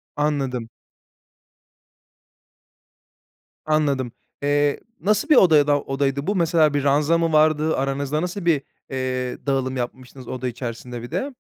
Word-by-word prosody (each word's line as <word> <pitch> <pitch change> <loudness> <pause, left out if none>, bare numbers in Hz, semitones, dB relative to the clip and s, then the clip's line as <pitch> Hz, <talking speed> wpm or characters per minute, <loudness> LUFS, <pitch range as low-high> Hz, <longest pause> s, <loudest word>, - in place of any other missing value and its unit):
Anladım. 135 -6 -1 3.0
Anladım. 145 -5 +1 0.3
Eee, 145 0 +2 0.2
nasıl 210 +7 +1
bir 300 - +7
odayada 150 - +5
odaydı 140 +2 -2
bu? 205 - +1
Mesela, 165 -3 +3
bir 145 -1 0
ranza 145 +4 +3
mı 165 -1 0
vardı 155 0 +3
aranızda? 140 +2 -1
Nasıl 180 +1 -4
bir, 160 -5 +3 0.3
eee, 130 -1 -3
dağılım 135 -1 0
yapmıştınız 125 +1 -6
oda 130 0 -4
içerisinde 120 0 -6
bir 120 - -9
de? 260 - -2
145 Hz, 120 wpm, -22 LUFS, 130-155 Hz, 3.0 s, bir